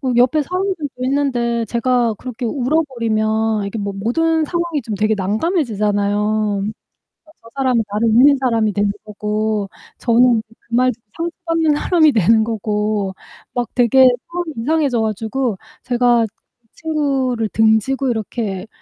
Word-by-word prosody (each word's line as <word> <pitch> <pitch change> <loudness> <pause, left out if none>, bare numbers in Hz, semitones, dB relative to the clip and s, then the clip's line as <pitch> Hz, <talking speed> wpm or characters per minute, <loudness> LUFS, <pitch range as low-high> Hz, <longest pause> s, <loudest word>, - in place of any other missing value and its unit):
옆에 250 +5 +4
사람들도 365 -1 -2 0.2
있는데 245 -4 0
제가 235 0 +1
그렇게 245 +3 -6
울어버리면 225 -6 0
이게 200 +3 -5
모 200 0 -3
모든 315 +11 0
상황이 340 -2 -2
좀 220 - -5
되게 215 +2 +1
난감해지잖아요. 210 - 0 0.8
저 230 - -15
사람은 255 -4 +2
나를 215 +2 +1
믿는 265 +6 +6
사람이 230 -5 +1
되는 205 0 +1
거고, 210 -1 -2 0.3
저는 235 -1 +3
그 225 - -21 0.2
말 255 +1 +3
듣고 225 -2 -16 0.4
상처받는 325 -2 +2
사람이 315 0 +3
되는 220 0 +3
거고 210 -3 -2 0.4
막 240 -2 -1
되게 255 +2 +5 0.2
마음이 345 -2 -4
이상해져가지고 240 -5 0 0.3
제가 240 -2 +2 0.5
친구를 270 -8 -1
등지고 220 +6 +2
이렇게 215 -3 -3
235 Hz, 295 characters per minute, -18 LUFS, 215-270 Hz, 0.8 s, 믿는